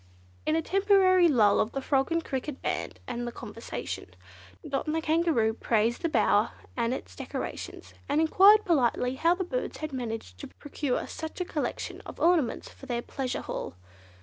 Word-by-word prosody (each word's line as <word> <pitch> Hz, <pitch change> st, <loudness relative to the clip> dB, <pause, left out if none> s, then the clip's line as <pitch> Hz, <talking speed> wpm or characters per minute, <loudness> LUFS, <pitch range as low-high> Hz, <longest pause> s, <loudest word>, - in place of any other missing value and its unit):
In 310 Hz, -, +3 dB
a 325 Hz, -, +1 dB
temporary 380 Hz, -1 st, +4 dB
lull 220 Hz, -9 st, +4 dB
of 215 Hz, -, 0 dB
the 275 Hz, -, -1 dB
frog 270 Hz, +2 st, +1 dB
and 330 Hz, -1 st, 0 dB
cricket 265 Hz, +1 st, -4 dB
band -, -, -3 dB
and 240 Hz, 0 st, -4 dB
the -, -, -3 dB
conversation, 90 Hz, -, -7 dB, 0.5 s
Dot 275 Hz, +2 st, -2 dB
and 305 Hz, -, 0 dB
the -, -, +2 dB
Kangaroo 315 Hz, -9 st, +2 dB
praised 230 Hz, 0 st, +1 dB
the 335 Hz, -, 0 dB
bower 215 Hz, -5 st, +3 dB, 0.2 s
and 235 Hz, -1 st, 0 dB
its 260 Hz, -, -5 dB
decorations, -, -, -6 dB, 0.2 s
and 290 Hz, +2 st, +2 dB
enquired 395 Hz, +7 st, +6 dB
politely 255 Hz, -, +2 dB
how 335 Hz, +6 st, +3 dB
the 375 Hz, -, -2 dB
birds -, -, -3 dB
had 310 Hz, -2 st, -5 dB
managed 225 Hz, -, -5 dB
to -, -, -7 dB
procure 285 Hz, -2 st, -3 dB
such 320 Hz, +2 st, -7 dB
a 360 Hz, -, -1 dB
collection 310 Hz, -4 st, -4 dB
of -, -, -9 dB
ornaments 325 Hz, -9 st, +2 dB
for 270 Hz, -, -13 dB
their 240 Hz, -1 st, -2 dB
pleasure 260 Hz, -2 st, -3 dB
hall. -, -, -5 dB
285 Hz, 175 wpm, -28 LUFS, 240-335 Hz, 0.5 s, enquired